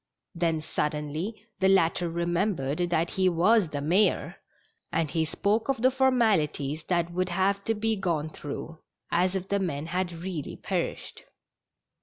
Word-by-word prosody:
Then 165 -3 0
suddenly 155 +8 -3
the 190 0 +4
latter 175 -2 +3
remembered 170 -3 -1
that 170 0 +1
he 185 -1 +2
was 185 +2 +3
the 145 -2 -3
mayor, 180 +5 +2 0.5
and 160 -3 0
he 160 -2 +1
spoke 210 - 0
of 255 -4 0
the 255 - +6
formalities 205 - +2
that 170 -1 0
would 185 +1 0
have 195 +3 +1
to 225 - +1
be 220 +1 0
gone 165 -5 -1
through, 155 +2 -7 0.3
as 180 +2 +2
if 190 0 -3
the 200 - +1
men 160 -6 -2
had 180 +1 -1
really 170 -2 -5
perished. - - -4
175 Hz, 150 wpm, -27 LUFS, 160-195 Hz, 0.5 s, the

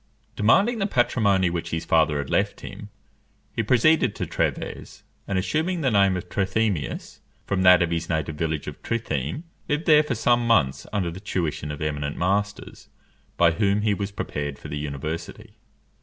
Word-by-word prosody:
Demanding 200 - +3
the 195 - +1
patrimony 100 - +2
which 85 -1 -3
his 80 0 -3
father 80 -2 +3
had 70 -2 -4
left - - 0
him, - - -9 0.7
he - - +1
proceeded 125 +8 +3
to - - -3
Trèves; - - -3 0.2
and 100 - -1
assuming 160 - -1
the 135 -4 +1
name 100 -3 +3
of 90 - -7
Trithemius, 100 -3 -2 0.3
from 100 -2 -1
that 90 -1 +7
of 85 - -2
his 85 0 -2
native 80 -2 -1
village 80 -1 -2
of - - -8
Trittheim, 80 - -3 0.3
lived 150 +3 0
there 150 -2 +7
for 150 -5 -2
some 120 +1 +2
months 70 - +2
under 95 -5 -1
the 90 - -8
tuition 80 -7 -3
of 75 +1 -5
eminent 75 -1 -3
masters, 100 +3 -2 0.5
by 85 -1 +5
whom 100 +3 +1
he 105 -1 +2
was 100 0 -3
prepared 75 -8 -4
for - - -10
the 75 - -4
university. 75 +3 -5
95 Hz, 170 wpm, -24 LUFS, 80-110 Hz, 0.7 s, that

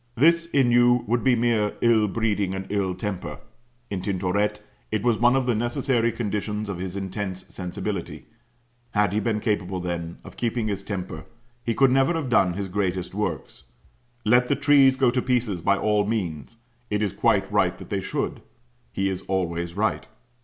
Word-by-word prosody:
This, 170 +6 +4
in 135 -7 +3
you, 120 0 +5
would 120 +3 0
be 130 -2 +4
mere 115 -3 +1
ill 115 -3 +4
breeding 105 -3 0
and 95 0 -4
ill 95 -3 0
temper. 95 -1 -4 0.5
In 95 -2 -2
Tintoret 100 +2 0 0.3
it 110 -2 -1
was 120 -3 +2
one 120 +2 +5
of 135 -1 +1
the 125 - +2
necessary 120 +1 +1
conditions 105 -2 -3
of 90 -3 -4
his 95 +1 -4
intense 95 -1 -4
sensibility; 95 0 -5 0.7
had 105 -2 +2
he 105 - +2
been 110 0 0
capable, 95 -4 -1
then, 85 -1 -4
of - - -12
keeping 115 -1 -1
his 100 -1 -2
temper, 90 -6 -6 0.4
he 115 - -1
could 135 -2 +4
never 135 +5 +3
have 155 -6 -2
done 95 -6 +4
his 100 +2 -3
greatest 90 -2 -2
works. 105 -8 -4 0.6
Let 125 +3 +4
the 140 - +2
trees 140 -2 +5
go 130 -3 +4
to 125 0 0
pieces, 120 -8 0
by 100 +3 +2
all 105 0 +2
means; 95 -3 -3 0.3
it 105 0 0
is 100 - -1
quite - - +2
right - - +2
they - - -4
should; - - -3 0.5
he 95 - -1
is 95 -1 -2
always 85 -2 -2
right. 110 +1 0
105 Hz, 175 wpm, -25 LUFS, 95-120 Hz, 0.7 s, you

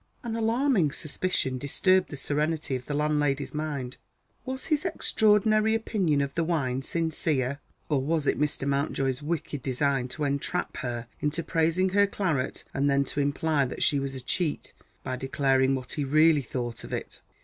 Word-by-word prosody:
An 230 -2 -3
alarming 230 - +2
suspicion 150 -5 -1
disturbed 185 +7 +2
the 145 - -6
serenity 150 +1 -1
of 125 0 -6
the 145 - -2
landlady's 145 -2 0
mind. 145 -4 -4 0.5
Was 260 0 -3
his 305 -2 +1
extraordinary 215 - +3
opinion 190 -10 +1
of 140 0 -2
the 165 - 0
wine 135 -6 0
sincere? 150 -4 -1 0.3
Or 145 -4 +1
was 155 +2 0
it - - +1
Mr. 145 -2 0
Mountjoy's 140 -1 0
wicked 150 -2 -3
design 135 0 0
to 150 +4 -4
entrap 140 -1 -2
her 120 -1 -4
into 150 +3 -1
praising 165 +3 +1
her 200 +2 +4
claret 165 -10 -1
and 140 +1 +1
then 140 0 +3
to 145 - -3
imply 145 +1 +1
that - - -3
she 145 - +4
was 135 0 -3
a 130 - -6
cheat 155 +5 -2 0.3
by 130 0 -3
declaring 135 0 +2
what 130 -1 -6
he 145 - -1
really 155 +2 +4
thought 120 -2 -5
of - - -9
it? - - -5
145 Hz, 170 wpm, -27 LUFS, 135-170 Hz, 0.5 s, her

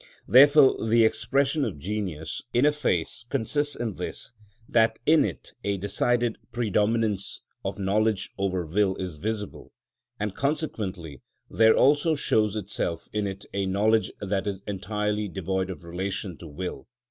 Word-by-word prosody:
Therefore 140 +1 +7
the 115 +1 +4
expression 140 +6 +1
of 110 - -3
genius 85 -2 -4
in 125 +4 +4
a 150 - +5
face 105 - -1
consists 145 +3 -1
in 115 -3 -3
this, - - -5 0.4
that 110 -1 +3
in 160 +1 +5
it 95 - -5
a 100 -1 0
decided 120 +4 0
predominance 110 -2 0 0.2
of - - -3
knowledge 105 +1 0
over 95 -3 -1
will 95 +4 +1
is 90 -5 -5
visible, 105 +3 -5 0.5
and 105 -2 -2
consequently 100 - -3 0.3
there 110 0 +5
also 145 +3 +4
shows 110 -7 +2
itself 95 -5 -3
in 105 -1 0
it 95 0 -6
a 100 -1 -1
knowledge 105 +3 +2
that 100 0 -2
is 100 -1 -4
entirely 105 +1 -2
devoid 95 0 -2
of 90 -3 -7
relation 90 +2 -4
to 85 - -9
will, 90 +5 -5
_i. - - -21
105 Hz, 145 wpm, -26 LUFS, 95-115 Hz, 0.5 s, Therefore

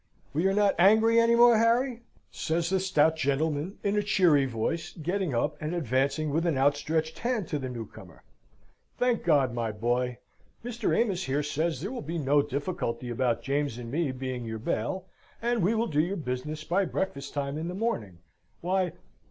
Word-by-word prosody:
"We 165 +6 +2
are 195 - +2
not 205 -1 +4
angry 220 +5 +6
any 230 0 +4
more, 235 -1 +6
Harry!" 235 +2 +2 0.3
says 170 +2 -1
the 190 - +2
stout 160 -4 +2
gentleman, 150 +4 -1
in 200 0 +1
a 210 - +3
cheery 175 -9 +3
voice, 120 +7 -3
getting 175 -2 -2
up 150 +6 0
and 155 +3 -2
advancing 140 +1 0
with 165 +4 +1
an 160 -5 +1
outstretched 150 +3 0
hand 235 -6 -1
to 150 - -1
the 130 -1 -4
new 120 -3 -5
comer. - - -14 0.7
"Thank 245 -2 +1
God, 140 -7 +3
my 115 -2 -2
boy! 120 +3 -1 0.5
Mr. 235 -2 -1
Amos 190 -6 0
here 140 +3 0
says, 155 0 -1
there 200 +7 -4
will 260 - -5
be 165 +3 -4
no 145 -1 +3
difficulty 140 -4 -3
about 120 -1 0
James 140 -2 -1
and 120 -1 -7
me 155 -1 0
being 130 -1 -4
your 110 -1 -4
bail, 120 - -2 0.3
and 235 -1 0
we 200 +6 +2
will 225 +1 +1
do 150 -7 +1
your 185 +5 -2
business 150 +1 -4
by 180 +5 +1
breakfast 150 -7 -3
time 140 0 -2
in 160 +2 -3
the 180 - -4
morning. 115 - -2 0.4
Why... 185 -1 0
155 Hz, 185 wpm, -28 LUFS, 135-190 Hz, 0.7 s, angry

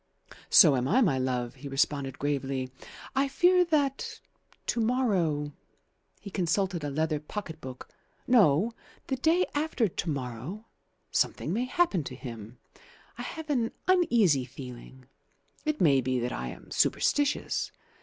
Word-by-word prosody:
"So 150 -5 +8
am 125 0 0
I, 245 - +4
my 145 - +3
love," 125 -2 -1
he 135 +2 -10
responded 135 -1 0
gravely. 135 -2 -2 0.4
"I 275 +1 +3
fear 360 +6 +4
that 285 -5 0 0.5
to - - -1
morrow" 190 - +1 0.7
he 200 - -9
consulted 180 -1 0
a 145 - -2
leather 155 +1 0
pocket 160 0 -7
book 130 -2 -8 0.4
"no, 215 - +4 0.3
the 265 - -1
day 325 +7 +3
after 290 -6 +1
to 170 -1 -4
morrow, 135 - -5 0.5
something - - 0
may 240 +5 0
happen 255 - +1
to 130 - -6
him. 115 -3 -9 0.6
I - - -3
have 320 -2 -5
an 235 -5 0
uneasy 235 - +4
feeling. 125 0 -10 0.6
It 305 0 0
may 140 -6 +5
be 130 0 0
that 120 +1 -2
I 65 - -4
am - - -10
superstitious. 290 0 +1
160 Hz, 140 wpm, -28 LUFS, -, 0.7 s, So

